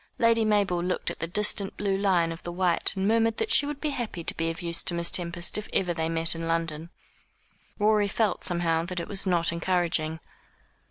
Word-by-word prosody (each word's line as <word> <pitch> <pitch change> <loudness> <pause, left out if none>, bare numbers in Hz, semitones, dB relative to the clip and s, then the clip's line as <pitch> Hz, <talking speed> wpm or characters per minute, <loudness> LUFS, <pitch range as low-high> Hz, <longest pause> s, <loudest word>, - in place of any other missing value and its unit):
Lady 230 -1 +3
Mabel 205 -5 +1
looked 180 0 -2
at - - -10
the 165 - -3
distant 200 +1 +2
blue 200 -1 0
line 185 -4 +1
of 165 - -8
the 175 - -6
Wight, 180 -1 0
and 190 0 -1
murmured 225 0 +2
that 440 - -2
she 285 - +4
would 295 -1 -5
be 300 0 -2
happy 230 -10 -4
to - - -3
be 165 0 -1
of 165 +1 -6
use 170 -1 0
to 175 - -1
Miss 170 0 0
Tempest 175 +2 0
if 210 - -9
ever 180 -2 +1
they 160 -1 -2
met 165 0 +2
in 165 0 -5
London. 165 -1 -2 0.9
Rorie 210 0 +3
felt, 210 +1 -1
somehow, 170 -2 +1
that 180 0 -4
it 170 - -5
was 195 -1 0
not 170 -2 +4
encouraging. 170 -2 -1
175 Hz, 215 wpm, -26 LUFS, 165-205 Hz, 0.9 s, she